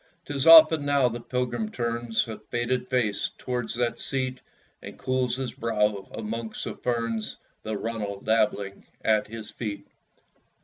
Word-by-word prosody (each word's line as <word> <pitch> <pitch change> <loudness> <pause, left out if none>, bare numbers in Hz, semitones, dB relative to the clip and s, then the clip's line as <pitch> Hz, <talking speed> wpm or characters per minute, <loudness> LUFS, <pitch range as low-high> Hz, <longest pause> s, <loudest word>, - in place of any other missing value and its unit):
'Tis 145 +1 -1
often 160 -2 +9
now 140 -2 +3
the 120 0 -3
pilgrim 120 -2 -2
turns 120 0 -1
A 110 - -6
faded 125 +1 -2
face 120 -6 0
towards 125 -3 -3
that 120 0 0
seat, 130 -1 -2 0.4
And - - -9
cools 130 -1 0
his 130 -2 -4
brow 105 -3 0
amongst 110 +1 -4
the - - -4
ferns; 115 -3 -2 0.2
The 110 -1 -3
runnel 105 -3 -4
dabbling 105 -2 0 0.2
at 110 -1 +3
his 110 0 -8
feet. 105 -4 -5
115 Hz, 140 wpm, -26 LUFS, 110-125 Hz, 0.4 s, often